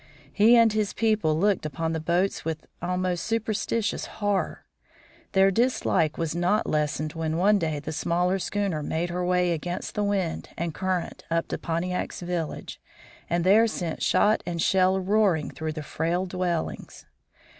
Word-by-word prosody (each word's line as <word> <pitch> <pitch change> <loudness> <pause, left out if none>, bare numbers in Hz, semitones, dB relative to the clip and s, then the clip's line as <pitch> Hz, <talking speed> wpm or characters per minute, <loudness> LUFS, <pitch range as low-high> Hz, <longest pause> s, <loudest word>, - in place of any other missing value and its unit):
He 220 +4 +6
and 230 -2 +5
his 215 -2 0
people 215 -9 +1
looked 200 +2 +2
upon 160 +2 -2
the 160 - -1
boats 175 +5 0
with 160 -1 -4 0.2
almost 180 0 -1
superstitious 225 0 -1
horror. 205 -2 -2 0.7
Their 195 0 +5
dislike 190 -8 +1
was 165 -2 -1
not 175 +6 +1
lessened 150 0 -1
when 160 -1 -2
one 205 +3 +4
day 160 -3 -1
the 150 +2 -6
smaller 180 +4 0
schooner 195 -5 -1
made 165 +4 -2
her 180 +1 -2
way 180 0 +2
against 175 +2 -4
wind 200 -5 -1
and 170 -1 -2
current 185 0 -2
up 165 0 0
to - - -3
Pontiac's 180 +3 -3
village, 175 -3 -4 0.5
and 170 0 +1
there 210 +5 +5
sent 175 -7 -4
shot 215 +1 +3
and 170 -1 -4
shell 190 +2 +3
roaring 190 -5 +2
through 155 0 -4
the 155 -1 -6
frail 170 +5 -1
dwellings. 180 -2 -3
180 Hz, 155 wpm, -26 LUFS, 165-200 Hz, 0.7 s, He